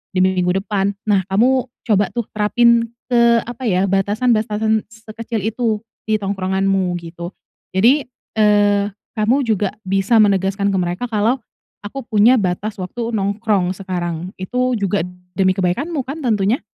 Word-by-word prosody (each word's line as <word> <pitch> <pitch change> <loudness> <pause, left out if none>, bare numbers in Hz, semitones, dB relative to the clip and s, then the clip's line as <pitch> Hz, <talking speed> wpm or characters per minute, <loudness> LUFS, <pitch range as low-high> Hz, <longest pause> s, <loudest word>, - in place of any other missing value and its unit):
di - - +2
minggu 185 -1 +2
depan. 200 -1 -1
Nah, 200 -3 +3
kamu 250 +6 +3 0.2
coba 205 -2 +3
tuh, 235 -1 -2
terapin 230 +2 +3 0.2
ke, 235 -1 +5
apa 240 +2 -8
ya, 185 -2 +2
batasan-batasan 215 +2 +1
sekecil 225 +1 -6
itu, 220 0 0 0.3
di 215 - +2
tongkronganmu, 195 -1 0
gitu. 170 +1 -8 0.4
Jadi, 250 +9 +4 0.3
eee, 205 -1 +4 0.3
kamu 235 +6 +2
juga 205 -3 +1 0.2
bisa 195 +4 +2
menegaskan 200 0 +1
ke 195 - 0
mereka 175 +4 -2
kalau, 220 +5 +1 0.4
"Aku 270 +7 -6
punya 225 +3 +5
batas 200 +2 -2
waktu 230 +6 -4
nongkrong 200 -2 0
sekarang." 180 -2 -4
itu, 250 +7 -1
juga 200 0 0 0.3
demi 185 -1 +2
kebaikanmu 260 - -1
kan, 275 +5 -6
tentunya. 215 - +1
210 Hz, 135 wpm, -19 LUFS, 190-230 Hz, 0.4 s, ke